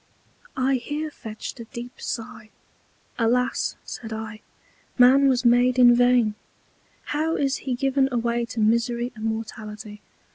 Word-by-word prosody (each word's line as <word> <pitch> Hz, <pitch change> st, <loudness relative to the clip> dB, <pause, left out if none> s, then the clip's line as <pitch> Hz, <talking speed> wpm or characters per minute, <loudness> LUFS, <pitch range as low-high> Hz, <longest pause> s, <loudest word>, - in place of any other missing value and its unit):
I 260 Hz, +1 st, +2 dB
here 300 Hz, +5 st, -4 dB
fetched 220 Hz, -1 st, -8 dB
a 230 Hz, -, -7 dB
deep 240 Hz, +2 st, -9 dB
Sigh, 220 Hz, -1 st, -6 dB, 0.7 s
Alas, 250 Hz, +2 st, +1 dB
said 225 Hz, -2 st, -7 dB
I, 220 Hz, -1 st, -6 dB, 0.6 s
Man 265 Hz, +2 st, +6 dB
was 255 Hz, -1 st, +1 dB
made 245 Hz, +1 st, +4 dB
in 245 Hz, -1 st, +7 dB
vain! 245 Hz, -3 st, +3 dB, 0.8 s
How 315 Hz, +2 st, 0 dB
is 275 Hz, -1 st, 0 dB
he 255 Hz, -2 st, -3 dB
given 270 Hz, +1 st, +1 dB
away 235 Hz, 0 st, 0 dB
to 235 Hz, -, -6 dB
Misery 235 Hz, +2 st, +1 dB
and 220 Hz, 0 st, -6 dB
Mortality! 215 Hz, -1 st, -6 dB
240 Hz, 135 wpm, -24 LUFS, 225-255 Hz, 0.8 s, in